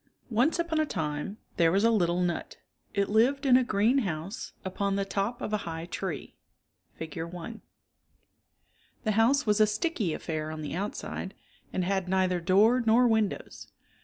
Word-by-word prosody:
NCE 250 Hz, +11 st, +3 dB
upon 335 Hz, -2 st, 0 dB
a 310 Hz, -, +3 dB
time 150 Hz, -, -3 dB, 0.2 s
there 165 Hz, -2 st, +4 dB
was 195 Hz, +3 st, +2 dB
a 230 Hz, -, +5 dB
little 175 Hz, -4 st, +2 dB
nut. 175 Hz, -1 st, -3 dB, 0.4 s
It 200 Hz, -1 st, +2 dB
lived 255 Hz, +7 st, +2 dB
in 255 Hz, -2 st, +6 dB
a 255 Hz, -, +5 dB
green 235 Hz, +3 st, +2 dB
house 185 Hz, +1 st, -4 dB
upon 195 Hz, +1 st, -1 dB
the 200 Hz, 0 st, 0 dB
top 200 Hz, +5 st, -2 dB
of 215 Hz, -, -3 dB
a -, -, +3 dB
high 165 Hz, 0 st, -5 dB
tree 175 Hz, -4 st, -5 dB, 0.6 s
(Fig. 160 Hz, 0 st, -7 dB
i). 175 Hz, +7 st, -6 dB, 1.4 s
The 215 Hz, -, +1 dB
house 235 Hz, +7 st, +3 dB
was 210 Hz, 0 st, +3 dB
a 215 Hz, -, +6 dB
sticky 215 Hz, -, -1 dB
affair 155 Hz, -2 st, -4 dB
on 155 Hz, 0 st, -6 dB
the 150 Hz, -, -5 dB
outside 195 Hz, +1 st, -4 dB, 0.4 s
and 185 Hz, -, -1 dB
had 190 Hz, -1 st, -1 dB
neither 185 Hz, -1 st, +2 dB
door 210 Hz, +8 st, +4 dB
nor 235 Hz, +2 st, +5 dB
windows. 220 Hz, -3 st, -1 dB
200 Hz, 165 wpm, -28 LUFS, 175-230 Hz, 1.4 s, in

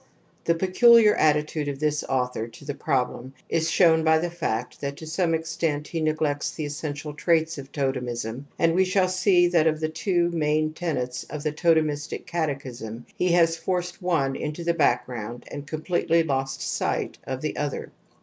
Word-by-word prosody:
The 170 Hz, -, +3 dB
peculiar 215 Hz, +5 st, +6 dB
attitude 150 Hz, 0 st, +1 dB
of 140 Hz, -1 st, -3 dB
this 150 Hz, +1 st, 0 dB
author 125 Hz, -3 st, -1 dB
to 120 Hz, +5 st, -14 dB
the 145 Hz, -, -3 dB
problem 130 Hz, -2 st, -2 dB
is 165 Hz, 0 st, +1 dB
shown 160 Hz, -3 st, +4 dB
by 160 Hz, 0 st, +5 dB
the 170 Hz, +2 st, -2 dB
fact 125 Hz, -8 st, -3 dB
that 140 Hz, 0 st, -4 dB
to 160 Hz, -, -8 dB
some 165 Hz, +1 st, +1 dB
extent 160 Hz, -2 st, -2 dB
he 165 Hz, -, -2 dB
neg 155 Hz, 0 st, +1 dB
lects 145 Hz, -2 st, -1 dB
the 155 Hz, -, -3 dB
essential 145 Hz, 0 st, -5 dB
traits 160 Hz, 0 st, +1 dB
of 135 Hz, 0 st, -10 dB
totemism, 125 Hz, -2 st, -3 dB
and 165 Hz, 0 st, +3 dB
we 185 Hz, +2 st, +4 dB
shall 185 Hz, 0 st, +2 dB
see 185 Hz, -1 st, +3 dB
that 165 Hz, -2 st, +3 dB
of 155 Hz, -1 st, +1 dB
the 155 Hz, 0 st, -1 dB
two 175 Hz, +1 st, 0 dB
main 155 Hz, -1 st, +1 dB
tenets 130 Hz, -7 st, -3 dB
of 150 Hz, 0 st, -7 dB
the 155 Hz, -, 0 dB
totem 160 Hz, 0 st, +3 dB
istic 150 Hz, +2 st, -5 dB
catechism 130 Hz, -8 st, -4 dB
he 180 Hz, -1 st, +1 dB
has 165 Hz, -1 st, +4 dB
forced 180 Hz, +1 st, -3 dB
one 155 Hz, -7 st, +1 dB
into 150 Hz, +4 st, -4 dB
the 170 Hz, 0 st, +1 dB
back 140 Hz, -7 st, +2 dB
groimd 120 Hz, 0 st, -6 dB
and 145 Hz, 0 st, -7 dB
completely 165 Hz, +1 st, +1 dB
lost 135 Hz, -3 st, -2 dB
sight -, -, -2 dB
of 130 Hz, 0 st, -3 dB
the 155 Hz, -, -3 dB
other. 145 Hz, -2 st, -3 dB
155 Hz, 185 wpm, -25 LUFS, 140-170 Hz, -, peculiar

